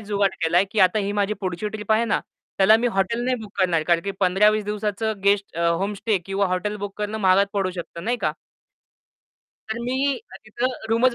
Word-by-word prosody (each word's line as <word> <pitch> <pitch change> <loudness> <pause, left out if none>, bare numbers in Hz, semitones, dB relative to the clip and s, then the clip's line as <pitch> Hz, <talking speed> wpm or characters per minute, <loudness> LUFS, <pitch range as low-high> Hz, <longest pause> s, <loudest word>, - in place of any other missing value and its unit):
जुगाट 205 -2 0
केलाय, 175 +4 +3
की 215 - 0
आता 185 +3 +4
ही 200 0 -1
माझी 205 +1 0
पुढची 185 +2 -3
ट्रिप 215 0 -2
आहे 225 +2 +3
ना 230 - 0 0.4
त्याला 200 +3 +7
मी 240 - 0
हॉटेल 195 +5 0
नाही 255 0 +1
बुक 210 -1 -12
करणार. 175 -4 +2
कारण 170 +1 +2
की 200 - -1
15-20 210 +3 +3
दिवसाचं 210 0 -2
गेस्ट 200 -3 +1
अ, 170 - +1
होमस्टे 200 +4 0
किंवा 195 0 0
हॉटेल 185 +3 -2
बुक 205 -1 -6
करणं 210 +1 -3
महागात 195 0 +4
पडू 195 -2 0
शकत 170 0 -7
नाही 240 +1 0
का? - - 0 1.4
तर 220 +1 -3
मी 265 +2 0
अ, 450 - -14
तिथं 255 +2 -2 0.2
रूमच 235 +2 +3
205 Hz, 200 wpm, -23 LUFS, 190-220 Hz, 1.4 s, त्याला